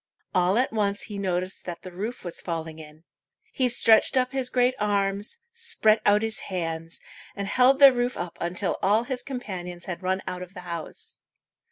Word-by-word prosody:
All 180 +3 +3
at 250 -1 +1
once 205 -2 0
he 205 -2 -6
noticed 185 -1 -2
that 175 -2 -6
the 185 - -8
roof 210 +7 -5
was 175 -2 -3
falling 160 -2 -5
in. 155 +1 -13 0.5
He 255 -2 +1
stretched 230 +2 +4
up 255 0 +2
his 265 -2 -1
great 250 0 +3
arms, 200 - 0 0.2
spread 455 - +3
out 205 +1 +5
his 225 0 -1
hands, 165 -3 -4 0.4
and 200 -1 -4
held 255 +5 +4
the 275 -2 +9
roof 245 0 -1
up 175 -1 -5
until 175 +2 -1
all 210 +4 +3
his 250 0 -4
companions 180 -9 -6
had 175 -1 -5
run 190 +1 -1
out 180 - -5
of 180 +2 -9
the 180 - -7
house. 170 -3 -6
200 Hz, 185 wpm, -26 LUFS, 175-245 Hz, 0.5 s, the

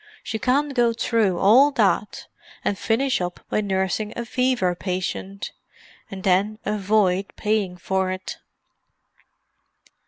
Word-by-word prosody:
She 220 - -4
can't 280 +4 +1
go 240 -2 +3
through 225 -5 +1
all 235 +10 +6
that - - +1 0.4
and 205 - +1
finish 230 +4 0
up 180 0 -4
by - - +1
nursing 195 +2 -1
a 235 - -4
fever 250 -7 +1
patient—and 190 +1 -7
then 200 +3 +2
avoid 200 -2 +1
paying 210 -4 -1
for 190 +1 -1
it." 185 0 -5
205 Hz, 115 wpm, -23 LUFS, 190-230 Hz, 0.4 s, all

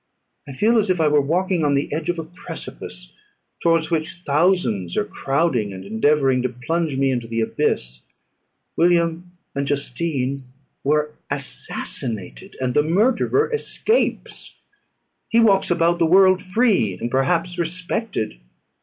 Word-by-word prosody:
I 140 - -7
feel 225 - +3
as 210 -2 0
if 180 -2 +1
I 160 - +3
were 150 -1 +4
walking 175 +4 0
on 145 -1 +2
the 140 +1 -1
edge 160 +2 -3
of 175 - 0
a 165 - -3
precipice, 160 - -9 0.5
towards 165 -1 +2
which 165 +2 -2
thousands 145 - +1
are - - +1
crowding, 135 -6 0
and 95 0 -9
endeavouring 130 +4 +2
to 130 - 0
plunge 145 +4 -2
me 135 0 +2
into 120 -3 -2
the 115 0 -2
abyss. 60 - -1 0.7
William 170 +1 +1 0.2
and 140 0 -2
Justine 140 -1 -2 0.4
were 150 +1 +1 0.2
assassinated, 65 - -5
and 130 -1 -1
the 150 - +4
murderer 235 - +2
escapes; 450 +1 -1 0.7
he 230 - +4
walks 200 -4 +4
about 170 0 +2
the 165 - +3
world 185 +1 +5
free, 185 - +1
and 120 - -3
perhaps 170 +6 0
respected. 175 - -3
155 Hz, 140 wpm, -21 LUFS, 130-180 Hz, 0.7 s, world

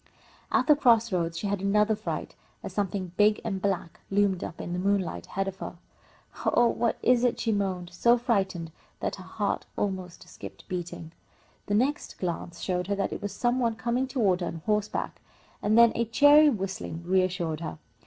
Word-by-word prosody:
At - - +3
the 300 - +6
cross 235 -5 +4
roads 170 -2 -1
she 205 - -4
had 200 -1 -1
another 210 +2 +3
fright, - - -5 0.3
as - - -6
something 195 -3 -2
big 210 0 +4
and 195 -4 -3
black 190 -4 -2
loomed 195 -2 +2
up 170 - -7
in 175 - -4
the 180 - -2
moonlight 185 - -1
ahead 195 +1 -2
of 190 -1 -5
her. - - -6 0.7
"Oh, 240 -1 +4
what 230 0 0
is 250 -1 +4
it?" 245 - +1
she 225 - 0
moaned, 190 -4 -2
so 235 +6 +4
frightened 190 -8 -1 0.3
that - - -3
her - - -10
heart - - -2
almost 185 -3 -3
stopped 100 -1 -11
beating. 175 -2 -5 0.6
The 205 - +1
next 265 +7 0
glance 170 -1 -4
showed 180 -1 -1
her 200 - 0
that 200 - -1
it - - -6
was 205 -1 -3
some 240 +5 0
one 230 -2 +1
coming 240 +3 -1
toward 205 -9 +1
her 175 - -1
on 165 -1 -6
horseback, 210 -1 -1 0.4
and 215 +2 +2
then 235 -1 +8
a 235 - 0
cheery 290 +6 +6
whistling 195 - -4
reassured 180 -3 0
her. 160 - -5
200 Hz, 190 wpm, -27 LUFS, 180-230 Hz, 0.7 s, then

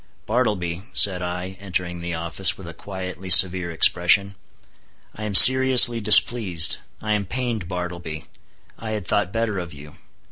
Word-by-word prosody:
"Bartleby," 105 -7 -4
said 95 -3 +2
I, 90 +1 -8
entering 90 -3 -7
the 85 0 -7
office, 85 +3 0
with 95 - -13
a 85 - -11
quietly 95 +1 -10
severe 90 0 +5
expression, 90 +4 +1 0.8
"I 110 - -10
am 105 -2 -6
seriously 130 -1 +6
displeased. 100 -6 +3 0.3
I 110 0 -3
am 100 -2 -4
pained, 120 -5 -6
Bartleby. 85 -4 -9 0.5
I 110 -1 -8
had 105 -4 -7
thought 90 - -3
better 115 -3 -4
of 85 -3 -10
you. 75 0 -16
95 Hz, 145 wpm, -19 LUFS, 85-105 Hz, 0.8 s, seriously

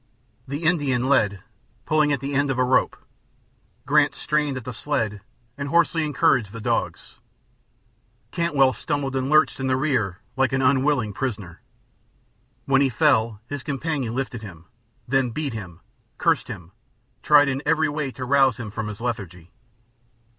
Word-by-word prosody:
The 140 +5 -5
Indian 145 -7 +1
led, 105 -8 +2 0.4
pulling 155 -1 +2
at 140 -3 0
the 140 +1 -4
end 140 0 +1
of 135 - -1
a 130 - +3
rope; 125 +1 +2 0.9
Grant - - +3
strained 150 -3 -1
at 130 - -6
the 125 - -5
sled 110 -6 -2 0.4
and 140 0 -3
hoarsely 165 0 +2
encouraged 130 -7 +2
the 115 - -7
dogs; 110 - -3 1.1
Cantwell 145 -7 +2
stumbled 140 -2 -3
and 130 0 -1
lurched 155 -1 +3
in 135 - -2
the 130 - +2
rear 130 -10 0 0.2
like 135 -1 +1
an 135 - +1
unwilling 130 -4 +2
prisoner. 105 -9 -5 1.0
When 135 0 +3
he 135 - +3
fell 115 -6 +2
his 145 +2 -6
companion 140 -4 -3
lifted 125 -3 -3
him, 90 -6 -11 0.4
then 135 -1 +1
beat 140 +2 -3
him, 90 -7 -8 0.4
cursed - - +1
him, 85 0 -9 0.5
tried 145 -1 +5
in 135 0 -1
every 160 +1 +2
way 145 -1 -2
to 130 - -6
rouse 135 -2 +3
him 110 -4 -6
from 110 0 -4
his 105 +1 -7
lethargy. 95 -8 -5
135 Hz, 155 wpm, -23 LUFS, 115-145 Hz, 1.1 s, tried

